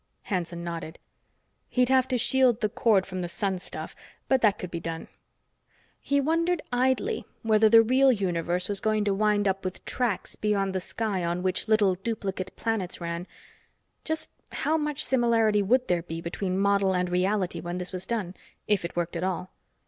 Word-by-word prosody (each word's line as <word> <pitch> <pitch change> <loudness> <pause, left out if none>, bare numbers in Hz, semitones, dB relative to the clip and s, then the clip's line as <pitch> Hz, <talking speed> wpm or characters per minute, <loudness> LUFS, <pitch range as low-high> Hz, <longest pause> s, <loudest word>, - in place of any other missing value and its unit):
Hanson 170 -3 -3
nodded. 170 -1 -5 0.7
He'd 250 0 +2
have 260 -1 +4
to 255 -1 0
shield 250 -1 +3
the 215 - +1
cord 205 -3 +3
from 185 -1 -5
the 175 - -3
sun 190 +1 -2
stuff, - - -7 0.3
but 265 -1 +3
that 210 -3 +4
could 180 - -7
be 170 - -3
done. 165 0 -6 0.9
He 280 0 +1
wondered 330 +4 +1
idly 260 - +1 0.2
whether 220 -1 +4
the 225 +1 +8
real 260 +3 +4
universe 180 -4 -1
was 200 -1 -2
going 215 0 +1
to 200 - +2
wind 205 0 +2
up 195 0 0
with 185 0 -5
tracks 240 -6 -2
beyond 200 -2 0
the 190 - 0
sky 195 0 -2
on 170 +1 -1
which 185 +3 -1
little 215 -3 +4
duplicate 195 -1 -4
planets 220 -6 -2
ran 170 +1 -4 0.8
just 315 0 -3 0.2
how 315 - 0
much 300 -2 0
similarity 230 -4 +3
would 250 +6 +2
there 175 -1 +1
be 165 -1 -6
between 185 +2 -3
model 200 -1 +2
and 180 0 0
reality 185 +1 0
when 175 +1 -4
this 180 0 -3
was 185 0 -5
done, 210 -7 -2 0.3
if 205 -4 +2
it 170 - -5
worked 175 0 -2
at 170 - -2
all? 185 -1 -2
200 Hz, 180 wpm, -27 LUFS, 180-230 Hz, 0.9 s, the